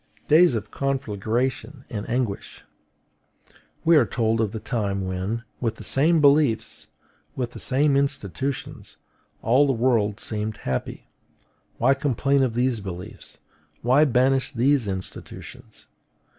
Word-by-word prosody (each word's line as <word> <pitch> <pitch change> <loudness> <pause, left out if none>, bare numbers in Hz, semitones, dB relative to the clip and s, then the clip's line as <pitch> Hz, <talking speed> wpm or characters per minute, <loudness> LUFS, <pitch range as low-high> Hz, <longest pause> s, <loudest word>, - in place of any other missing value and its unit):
Days 160 -3 +5
of 110 -1 -4
conflagration 130 +1 -2
and 105 0 -6
anguish! 120 -5 -3 1.2
We 165 +1 +6
are 135 - +5
told 115 +1 0
of 110 -3 0
the 110 - -5
time 100 -4 -2
when, 95 +5 -3 0.2
with 115 -2 -1
the - - -10
same 160 +5 +3
beliefs, 140 -5 +2 0.5
with 125 -2 -3
the - - -9
same 140 +2 +2
institutions, 140 -1 -3 0.5
all 130 +6 +4
the 135 - +2
world 115 -4 +1
seemed 105 -1 -2
happy: 65 -7 -4 0.7
why 130 +4 +4
complain 140 0 +1
of 125 -4 0
these 125 -1 +1
beliefs; 90 -3 -8 0.5
why 130 +6 +5
banish 130 0 +2
these 130 -1 +2
institutions? 95 -1 -8
125 Hz, 125 wpm, -24 LUFS, 110-135 Hz, 1.2 s, We